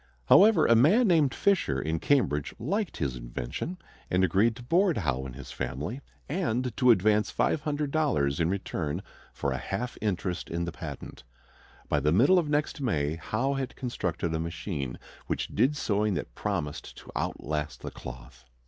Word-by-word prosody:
However, 205 -5 +7
a 115 - +6
man 185 - +5
named 160 -7 +4
Fisher 180 - +1
in 80 +6 -1
Cambridge 80 - +1
liked 195 - -2
his 70 -5 -1
invention, - - -5 0.3
and 90 +1 +2
agreed 100 +6 +3
to 120 - -10
board 175 +5 +3
Howe 70 - -1
and 60 - -9
his 65 -1 -9
family 70 - -4 0.3
and 125 - -1
to 125 - +4
advance 105 -1 +4
$500 145 - 0
in 80 0 +2
return 90 -5 -2 0.3
for 70 - -2
a 65 - -2
half 120 - -4
interest 90 -4 -2
in 85 +1 -2
the 85 - -4
patent. 75 -7 -8 0.6
By 75 - +2
the 75 +2 +2
middle 135 - +5
of 155 -4 -2
next 150 0 0
May, 75 - 0
Howe 120 +11 -1
had 135 -2 -3
constructed 90 -9 -2
a 80 - -1
machine 80 -5 -4 0.3
which - - -2
did 145 +3 +2
sewing 105 -6 +1
that - - -4
promised 85 -8 -4
to - - -12
outlast 75 +1 -3
the - - -6
cloth. 65 0 -10
100 Hz, 165 wpm, -28 LUFS, -, 0.6 s, However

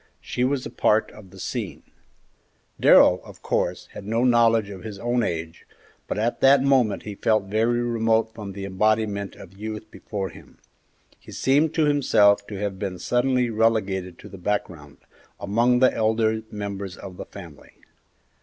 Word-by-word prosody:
She 125 - -3
was 130 0 0
a - - -6
part 110 +1 +2
of 105 -3 -14
the - - -15
scene. - - -5 1.0
Darrell, - - +6
of - - -14
course, - - -1
had - - -9
no 115 +4 0
knowledge 115 -4 +3
of 95 -2 -9
his 110 -3 -7
own 120 +4 0
age, 80 -4 -4 0.4
but - - -3
at 115 +3 -1
that 135 0 +6
moment 130 -7 +2
he 105 - -6
felt 110 +1 +1
very 115 +4 0
remote 115 -1 +1
from 100 -3 -8
the 100 0 -6
embodiment 100 0 0
of 95 0 -13
youth 110 0 -6
before 100 -3 -5
him; 80 - -16 0.6
he - - -14
seemed 145 +4 +1
to 160 - +3
himself 105 -8 +3
to 105 - -7
have 100 -2 -3
been 95 -3 -4
suddenly 125 +2 +1
relegated 100 -5 0
to - - -12
the 95 - -11
background, 90 -7 -4 0.4
among 120 +5 +2
the 130 +1 +4
elder 110 0 +1
members 100 -3 -6
of 90 -2 -10
the - - -7
family. 85 -7 -13
110 Hz, 165 wpm, -24 LUFS, 100-120 Hz, 1.0 s, Darrell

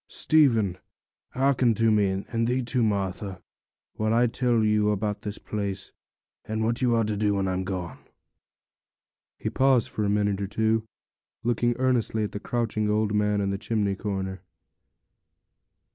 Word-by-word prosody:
Stephen, 115 - +3 0.5
hearken 130 -3 +2
to 115 +1 +3
me, 100 -2 +1
and 115 0 -1
thee 125 +1 0
too, 120 +1 0
Martha, 100 -3 -1 0.6
while 110 +1 +1
I 120 +1 +4
tell 120 -1 +1
you 105 -1 +2
about 105 0 -1
this 105 0 -5
place, 100 -2 -4 0.5
and 110 +1 -2
what 115 +3 0
you 120 -2 +3
are 115 - +2
to 105 0 -1
do 105 0 +1
when 95 -1 0
I'm 95 0 -1
gone.' 90 -4 -5 1.4
He - - -3
paused 130 -3 +3
for 105 - -3
a 100 - +1
minute 100 -1 +1
or 100 - -2
two, 110 +2 0 0.6
looking 120 0 +1
earnestly 125 -4 +1
at 105 - -3
the 105 - -5
crouching 110 -2 -1
old 105 0 +1
man 105 0 +1
in 100 0 0
the 100 - -3
chimney 105 -3 0
corner. 95 -1 -4
105 Hz, 160 wpm, -26 LUFS, 100-115 Hz, 1.4 s, I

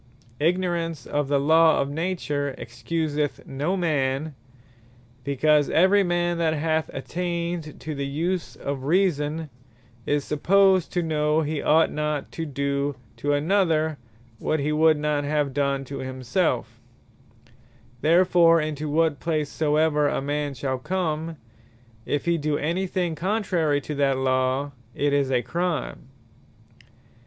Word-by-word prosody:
Ignorance 170 -3 0
of 145 -1 -1
the 140 0 +2
Law 160 +3 +5
of 140 - +1
Nature 150 -4 -2
Excuseth 145 +5 -3
no 150 +8 -2
man; 150 -3 0 0.9
because 145 +2 +2
every 190 +4 +4
man 175 -2 0
that 160 -1 +1
hath 160 +1 0
attained 170 +1 -4
to 155 - -4
the 140 -1 -3
use 165 +5 -2
of 140 -1 -5
Reason, 160 -2 +1 0.6
is 145 -1 0
supposed 190 +4 +3
to 175 - 0
know, 155 -1 +1
he 155 -1 -2
ought 160 +1 +3
not 150 -1 -2
to 165 -1 -5
do 140 0 -1 0.2
to 145 +5 0
another, 160 -1 +1 0.4
what 155 - 0
he 145 +2 -1
would 155 0 +4
not 150 -1 0
have 145 -1 0
done 140 -1 0
to 140 +2 -6
himselfe. 130 +6 -2 1.2
Therefore 170 +1 +5
into 155 -1 -3
what 155 -1 +1
place 155 -3 -1
soever 150 -1 +2
a - - 0
man 145 0 -2
shall 130 -1 -2
come, 160 0 -2 0.7
if 145 - -1
he 170 -1 +1
do 150 0 0
any 175 +5 -1
thing 180 -2 -1
contrary 175 -5 0
to 150 - -5
that 140 -2 +1
Law, 130 +1 0 0.2
it 145 0 +1
is 140 -2 +2
a 125 -2 +1
Crime. 165 -4 -3
150 Hz, 135 wpm, -24 LUFS, 145-165 Hz, 1.2 s, Law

